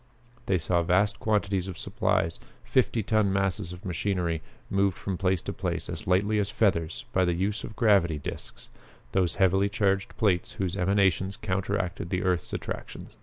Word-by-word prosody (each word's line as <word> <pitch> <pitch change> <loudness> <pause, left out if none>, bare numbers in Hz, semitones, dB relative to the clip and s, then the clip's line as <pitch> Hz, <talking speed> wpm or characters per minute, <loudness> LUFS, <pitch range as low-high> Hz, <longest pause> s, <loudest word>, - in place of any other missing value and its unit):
They 95 - +3
saw 85 +1 +1
vast 95 +4 +2
quantities 100 -3 0
of 95 - -6
supplies, 80 0 0 0.2
fifty 120 -3 +1
ton 110 -1 +2
masses 95 -2 0
of 90 +2 -10
machinery, 90 -2 -1 0.3
moved 100 -1 +1
from 95 - -3
place 95 -1 0
to - - -4
place - - -3
as - - -6
lightly 100 +4 +2
as 100 -1 0
feathers 100 +2 0
by 95 - +3
use 95 +5 -1
of - - -5
the - - -12
gravity 100 -9 +3
discs, 70 - -8 0.4
those 90 -4 +1
heavily 95 +1 +3
charged 100 -1 0
plates 95 -7 +1
whose 95 -2 -2
emanations 95 0 +2
counteracted 95 -2 -2
the 90 -1 -1
earth's 90 -2 0
attraction. - - -6
95 Hz, 165 wpm, -27 LUFS, 90-100 Hz, 0.4 s, They